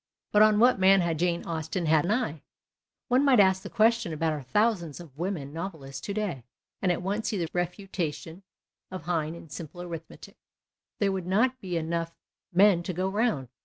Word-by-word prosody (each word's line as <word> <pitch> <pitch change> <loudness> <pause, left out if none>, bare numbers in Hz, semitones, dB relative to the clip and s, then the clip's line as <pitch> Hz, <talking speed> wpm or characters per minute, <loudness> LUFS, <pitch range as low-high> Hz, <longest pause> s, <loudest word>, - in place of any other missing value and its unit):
But 210 - +5
on 215 0 +6
Avhat 245 0 +5
man 190 0 +6
had 165 -3 -1
Jane 175 0 0
Austen 165 +2 -3
an 155 +2 +3
eye? 205 - -1 0.7
One 255 +2 +3
might 270 -5 +5
ask 190 -1 +4
the - - -8
question 230 -3 +2
about 160 0 0
our 150 - -4
thousands 175 - 0
of 160 -6 -12
women 160 -4 -4
novelists 160 -6 -6
to 200 - -2
day, 195 - -3 0.4
and 185 - +2
at 175 - -2
once 205 +4 -1
see 210 - -2
the 170 -3 -1
refutation 175 -2 -4 0.5
of 185 -4 -7
Heine 165 -1 -1
in 165 - -12
simple 155 +5 -8
arithmetic; 170 -2 -9 0.6
there 200 -2 +1
would 190 -2 -3
not 250 +7 +2
be 180 -3 -3
enough 165 +1 -2 0.4
men 190 -1 +5
to 180 +1 -4
go 185 +3 -1
round. 195 - 0
175 Hz, 185 wpm, -27 LUFS, 160-200 Hz, 0.7 s, on